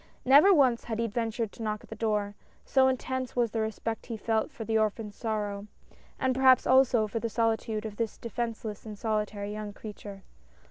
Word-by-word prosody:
Never 285 +10 +7
once 260 -9 +4
had 225 -2 -3
he 230 - 0
ventured 225 0 -2
to - - -12
knock 215 -1 -3
at - - -16
the - - -5
door, 210 -2 -1 0.3
so 265 -1 +4
intense 260 -1 -2
was 240 -3 +1
the 225 - -1
respect 220 +1 -4
he 230 -2 -4
felt 220 +1 0
for 225 - -7
the 225 - -1
orphan's 215 -1 0
sorrow, 210 -3 -3 0.5
and 260 -1 +1
perhaps, 260 -1 +5
also 255 -4 +4
for 220 +2 -3
the 230 - -2
solitude 225 -1 -1
of 210 -1 -6
this 230 -2 -2
defenceless 230 -3 -4
and 215 -2 -8
solitary 210 -1 -2
young 210 -1 -6
creature. 200 -2 -9
225 Hz, 190 wpm, -29 LUFS, 210-240 Hz, 0.5 s, Never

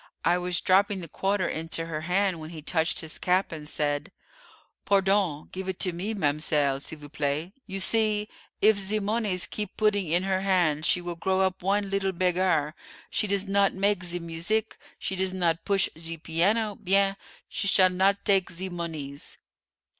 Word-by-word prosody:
I 175 +1 +3
was 180 0 0
dropping 195 +1 +3
the 170 - -7
quarter 195 +3 0
into 165 +1 -2
her 155 -2 -4
hand, 180 +1 +1
when 155 0 -8
he 160 -3 -9
touched 160 +1 0
his 160 -1 -7
cap, 185 +2 +1
and 150 -2 -7
said, 145 +5 -2 0.7
'Pardon, 195 -6 +1
give 190 0 -5
it 185 - -4
to 185 - +1
me, 200 +6 -3
ma'mselle, 145 -4 +1
s'il 160 - -6
vous 145 -1 -11
plaît. 150 +3 -2 0.2
You 195 -1 -4
see, 210 +1 +2 0.4
if 215 0 +6
ze 200 +2 0
monees 205 -3 0
keep 210 -1 -4
putting 210 -4 +2
in 175 +3 +2
her 190 -1 0
hand 175 -6 +2
she 180 - +2
will 175 0 -4
grow 190 +3 0
up 190 -1 0
one 200 +1 0
leetle 195 -1 0
beggair; 180 -4 +1 0.4
she 210 - +1
does 200 0 +1
not 200 0 +2
make 195 -1 +1
ze 175 0 -2
muzeek, 170 +7 -2 0.2
she 190 - -3
does 190 0 0
not 170 -3 0
push 200 -2 +3
ze 165 +1 -5
piano 200 +8 +1
bien, 195 0 +2 0.3
she 200 - -2
s'all 185 -2 +5
not 195 +2 +2
take 195 -2 +3
zee 185 +3 -5
monees." 155 -5 -6
185 Hz, 180 wpm, -27 LUFS, 165-195 Hz, 0.7 s, if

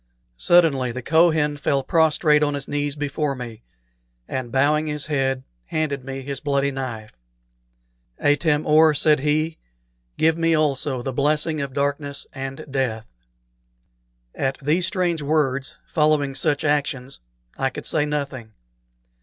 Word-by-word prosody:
Suddenly 140 - +3
the 130 +1 -6
Kohen 155 -1 +3
fell 140 -1 0
prostrate 150 0 +3
on 145 -1 +1
his 140 -1 -6
knees 145 0 -2
before 145 0 -2
me, 120 -3 -8 0.7
and 130 -2 -4
bowing 150 +3 +2
his 150 -1 -2
head 135 -3 -1 0.2
handed 145 - -2
me 135 0 -6
his 140 0 -5
bloody 140 -1 0
knife. 120 -5 -6 1.0
"Atam 150 +1 +2
or," 155 0 +5
said 150 0 +4
he, 155 +3 0 0.6
"give 160 +1 +2
me 165 0 +3
also 140 -4 0
the 135 - -3
blessing 150 +3 +1
of 140 -2 -4
darkness 140 0 -2
and 135 +2 -6
death!" 120 -5 -1 1.3
At 135 0 -2
these 160 +6 +1
strange 175 -5 0
words, 140 -3 0
following 150 -3 +1
such 145 +1 0
actions, 140 -3 -1 0.4
I 135 - 0
could - - -8
say 155 - +1
nothing. 140 -6 -4
145 Hz, 135 wpm, -22 LUFS, 135-155 Hz, 1.3 s, or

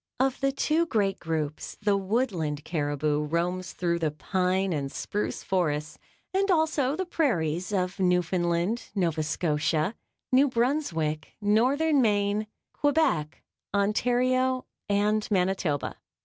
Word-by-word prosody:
Of 265 0 +1
the 275 -1 +2
two 315 +4 +1
great 200 -7 0
groups, 155 -2 -3
the 205 -1 +2
Woodland 190 - -1
caribou 145 -2 0
roams 175 +4 -2
through 170 -1 0
the 160 -2 +1
pine 185 +4 0
and 140 -3 -2
spruce 210 - -3
forests 155 -5 -1 0.3
and 390 +1 +1
also 315 -5 +2
the 375 - -2
prairies 180 - 0
of 185 -1 -1
Newfoundland, 180 +3 +1
Nova 170 -5 +1
Scotia, 155 +2 0 0.4
New 265 +3 +5
Brunswick, 230 - -1
Northern 260 +8 +3
Maine, 205 -1 +1 0.3
Quebec, 285 - +1 0.3
Ontario 250 +5 +2 0.2
and 210 +1 +2
Manitoba. 185 -6 0
195 Hz, 115 wpm, -27 LUFS, 165-255 Hz, 0.4 s, New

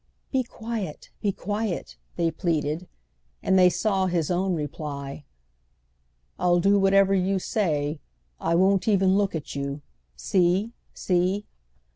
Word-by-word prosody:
"Be 265 - +2
quiet, 225 -8 -6
be 205 - +1
quiet!" 205 0 -3 0.2
they 170 -1 +1
pleaded; 160 0 -1 0.6
and - - +2
they 180 -1 +7
saw 190 0 +1
his 175 -2 0
own 185 +1 +1
reply: 145 -2 -5 1.1
"I'll 175 -1 +3
do 200 +3 +4
whatever 195 0 +4
you 195 +1 +2
say; 155 -7 -1 0.4
I 170 - +1
won't 190 +3 +3
even 195 -3 +4
look 200 -3 +1
at 155 -3 -5
you—see, 140 - -1 0.2
see!" 185 +3 0
180 Hz, 120 wpm, -25 LUFS, 155-195 Hz, 1.1 s, they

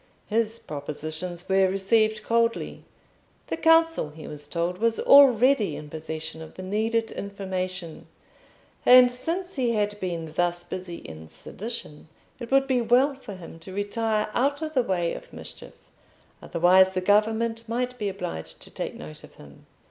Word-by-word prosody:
His 225 +1 0
propositions 155 +3 -5
were 190 0 +4
received 215 +3 +1
coldly; 230 +1 0 0.6
the - - -3
council, 325 - +4
he 155 +1 -11
was 145 -1 -8
told, 175 +3 -2
was 230 0 +1
already 255 - +6
in 150 -1 -9
possession 160 0 -6
of 160 - -11
the 185 - -8
needed 225 +4 0
information, 185 -4 -5 0.8
and 250 0 +8
since 340 +8 -4
he 245 -3 +1
had 210 -1 -1
been 170 -4 -4
thus 175 +1 0
busy 180 0 -6
in 80 - -10
sedition, 210 -9 -7 0.3
it 235 -2 -7
would 270 0 +4
be 260 -2 +1
well 250 +5 +3
for 240 -7 -10
him 165 -2 -11
to 185 +3 -10
retire 215 +1 -1
out 285 +4 0
of 310 0 -4
the 260 - +3
way 180 -7 -1
of - - -10
mischief, - - -10 0.7
otherwise 185 +3 +4
the 185 -1 -2
government 225 +3 +1
might 250 +1 -2
be 205 -2 -1
obliged 80 - -6
to - - -12
take - - -5
note 75 0 -10
of - - -15
him. 70 -1 -16
205 Hz, 155 wpm, -26 LUFS, 175-235 Hz, 0.8 s, and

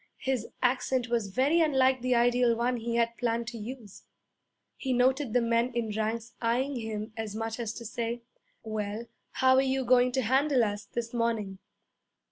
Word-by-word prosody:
his 260 -4 -2 0.2
accent 250 0 +1
was 230 -3 0
very 270 - +2
unlike 265 -4 +3
the 255 0 +2
ideal 240 0 +3
one 245 +1 0
he 230 0 -3
had 235 0 +1
planned 235 -1 0
to 235 -1 -6
use. 220 -2 -8 0.7
He 265 -2 -2
noted 255 +1 +2
the 245 - +3
men 230 +2 +1
in 225 -3 -2
ranks 225 +2 -2
eyeing 250 +4 0
him 220 -1 -5
as 220 -2 -5
much 225 +1 -3
as 230 -3 -2
to 235 - -8
say, 235 +1 -3 0.4
'Well, 215 0 -4 0.3
how 260 0 +4
are - - +6
you 265 -1 0
going 250 0 +4
to 260 0 +1
handle 265 +2 +3
us 205 -1 -2
this 235 +2 -5
morning?' 225 -5 -1
235 Hz, 175 wpm, -29 LUFS, 225-255 Hz, 0.7 s, are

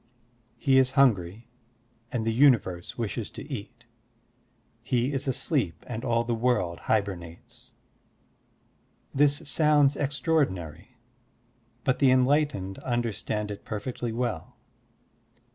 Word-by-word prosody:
He 135 -1 +4
is 130 -1 +2
hungry 115 - +2 0.6
and 115 -3 -2
the 115 - +1
universe 115 -9 +2
wishes 115 -4 -3
to - - -10
eat; 120 +4 -8 1.0
he 125 +3 0
is 135 +1 -2
asleep 125 - -1
and 115 -1 -5
all 115 -2 +1
the 120 0 -2
world 115 -8 0
hybemates. 95 -6 -3 1.4
This 145 +1 +3
sotmds 145 -2 +4
extraordinary, 125 - -1 0.9
but 130 - +1
the 135 - +5
enlightened 130 -7 +2
understand 110 -3 -2
it 100 - -8
perfectly 115 +2 -4
well. 120 0 -3
120 Hz, 105 wpm, -27 LUFS, 105-135 Hz, 1.4 s, the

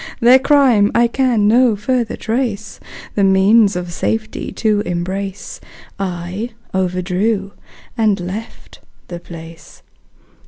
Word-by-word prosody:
Their 245 +3 +6
crime 265 -7 +4
I 235 - +5
can 235 -3 +1
no 235 +1 +4
further 235 +2 -1
trace 220 -3 -3 0.3
The 200 - +1
means 195 +2 +4
of 175 -1 -5
safety 220 +5 -3
to 215 -2 +1
embrace, 190 +2 -5 0.4
I 185 +4 -4 0.2
overdrew 190 +3 -1 0.4
and 215 -4 +1
left 190 +6 -8 0.3
the 175 -1 -6
place. 165 -1 -12
205 Hz, 110 wpm, -17 LUFS, 185-230 Hz, 0.4 s, Their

